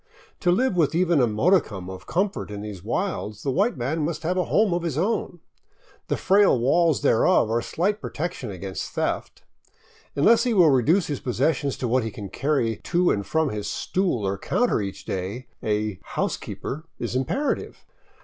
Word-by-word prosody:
To 180 - +1
live 215 +4 +2
with 160 -3 +2
even 170 -4 +3
a 125 - +4
modicum 110 - +1
of 95 0 -9
com 190 +4 +1
fort - - -7
in 105 -1 -6
these 100 -4 -7
wilds 110 - -3
the 140 - 0
white 200 - +1
man 140 +6 -1
must 160 +1 -3
have 175 +3 0
a 180 - +1
home 210 -4 +2
of 175 - 0
his 165 -5 -3
own. 180 -2 -1 0.7
The - - 0
frail 200 -6 +4
walls 155 +4 +2
thereof 110 0 +3
are 115 +1 +1
slight 200 - -1
protection 160 -7 -4
against 95 0 -6
theft. - - -3 0.7
Unless 225 +11 +5
he 245 -3 +1
will 170 -6 +6
reduce 155 - +3
his 145 -3 -3
possessions 140 +2 0
to 125 - -2
what 125 +1 +2
he 110 - -2
can 100 -2 -8
carry 130 -6 0
to 175 0 +1
and 100 - 0
from 160 +6 0
his 105 -1 -4
stool 180 - -1
or 95 0 -2
counter 245 - +1
each 100 -1 -6
day, 95 +7 -4 0.2
a 105 -2 -1
" - - -28
housekeeper 155 +5 -3
" 145 - -50
is - - -3
imperative. 195 - -2
145 Hz, 190 wpm, -24 LUFS, 110-180 Hz, 0.7 s, will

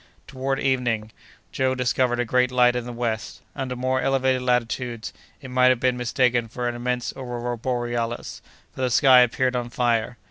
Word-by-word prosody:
Toward 135 0 -3
evening, 120 -5 0 0.4
Joe 130 0 0
discovered 125 -1 +1
a 120 - +1
great 125 +2 +2
light 125 -1 +4
in 125 -1 -2
the 120 - -6
west. 115 -2 -4
Under 130 -2 -4
more 130 +1 0
elevated 130 -1 +1
latitudes, 125 -1 -1 0.3
it 135 - -9
might 125 0 +4
have 130 -2 +4
been 125 0 +1
mistaken 125 -1 +1
for 120 +2 -4
an 120 - -1
immense 125 0 -2
aurora 120 -2 -4
borealis, 120 -1 -3 0.3
for - - -7
the 130 - +1
sky 130 +1 +6
appeared 125 +1 +2
on 120 -1 -2
fire. 120 -1 0
125 Hz, 175 wpm, -24 LUFS, 120-130 Hz, 0.4 s, sky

